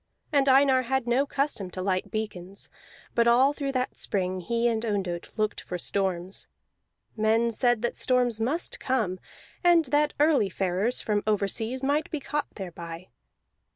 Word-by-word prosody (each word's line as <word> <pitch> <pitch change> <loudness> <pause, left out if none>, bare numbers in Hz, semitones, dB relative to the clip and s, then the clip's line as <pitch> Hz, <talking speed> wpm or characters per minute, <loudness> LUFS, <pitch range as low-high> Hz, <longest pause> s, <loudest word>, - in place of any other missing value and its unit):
And 280 -1 +4
Einar 265 -1 +5
had 260 0 -1
no 250 +4 +2
custom 275 -10 -2
to 185 - -6
light 185 -1 -1
beacons, 200 -3 -5 0.4
but 235 0 +3
all 255 +4 +5
through 280 -2 -3
that 255 -1 -1
spring 185 -2 0
he 235 +6 0
and 225 -1 0
Ondott 195 -6 -2
looked 215 -1 -1
for 180 - -5
storms. 190 0 -2 0.7
Men 225 +2 +2
said 240 0 +1
that 240 - -1
storms 245 -3 +1
must 275 +10 -1
come, 225 -9 -1 0.4
and 345 -2 +5
that 300 0 +3
early 290 -9 +4
farers 190 +6 0
from 210 -1 0
overseas 220 +5 0
might 290 +3 +1
be 310 - -3
caught 295 +1 -3
thereby. 170 -2 -8
230 Hz, 155 wpm, -27 LUFS, 195-265 Hz, 0.7 s, Einar